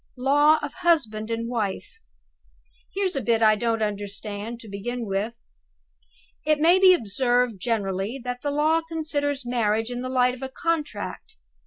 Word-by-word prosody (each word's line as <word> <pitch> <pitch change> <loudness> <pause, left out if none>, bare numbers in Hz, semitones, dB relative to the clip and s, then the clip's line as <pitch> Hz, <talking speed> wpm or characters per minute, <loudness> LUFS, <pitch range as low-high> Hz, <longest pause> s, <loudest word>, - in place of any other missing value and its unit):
"Law 290 +4 +4
of 290 - -4
husband 275 -12 +1
and 230 0 -2
wife. 235 - -3 1.0
Here's 385 -3 0
a 275 - -1
bit 230 -1 +1
I 215 0 +6
don't 225 +1 0
understand, 205 +2 -5
to 225 - -12
begin 230 +4 -4
with: 205 +3 -2 1.1
'It 305 0 +2
may 340 +4 +5
be 375 -1 +7
observed 245 - 0
generally 205 +1 -2
that 250 0 -4
the 290 - -2
law 305 +3 +2
considers 295 -4 -2
marriage 225 -1 0
in 245 0 -4
the 255 - -4
light 250 -1 +2
of 255 - -10
a 265 - -4
Contract. 300 -7 -3
245 Hz, 155 wpm, -25 LUFS, 215-290 Hz, 1.1 s, be